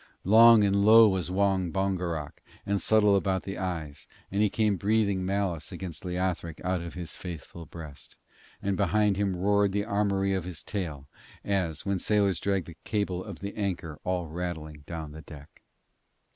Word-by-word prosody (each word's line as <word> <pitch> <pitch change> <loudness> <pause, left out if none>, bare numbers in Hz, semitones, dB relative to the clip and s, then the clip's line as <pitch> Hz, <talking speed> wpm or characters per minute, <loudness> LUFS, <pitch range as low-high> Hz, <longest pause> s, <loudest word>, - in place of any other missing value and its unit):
Long 115 +2 +8
and 100 0 +2
low 110 +1 +8
was 95 -3 0
Wong 95 -2 +1
Bongerok, 90 -6 -2 0.2
and 100 0 0
subtle 105 -2 +4
about 95 -1 0
the 95 - -6
eyes, 80 -6 -5 0.2
and 100 +2 0
he 105 - +4
came 105 0 +1
breathing 100 0 +1
malice 95 -4 -2
against 90 -3 -5
Leothric 90 -3 -2
out 90 -1 0
of 85 +1 -7
his 85 -2 -6
faithful 85 -1 -8
breast, 75 -4 -11 0.5
and 100 0 0
behind 100 +2 +2
him 100 -1 0
roared 100 +2 +2
the 100 0 0
armoury 100 -1 +1
of 95 -2 -1
his 85 -5 -7
tail, 80 -9 -4 0.4
as 90 -6 -1
when 100 -1 0
sailors 100 -3 +2
drag 100 -3 0
the 85 -2 -12
cable 95 -4 -2
of 100 -6 -9
the 100 +1 -5
anchor 90 -7 -3
all 90 -1 -1
rattling 80 -2 -5
down 80 -3 -6
the 80 +1 -9
deck. 75 -2 -14
95 Hz, 170 wpm, -28 LUFS, 85-100 Hz, 0.5 s, Long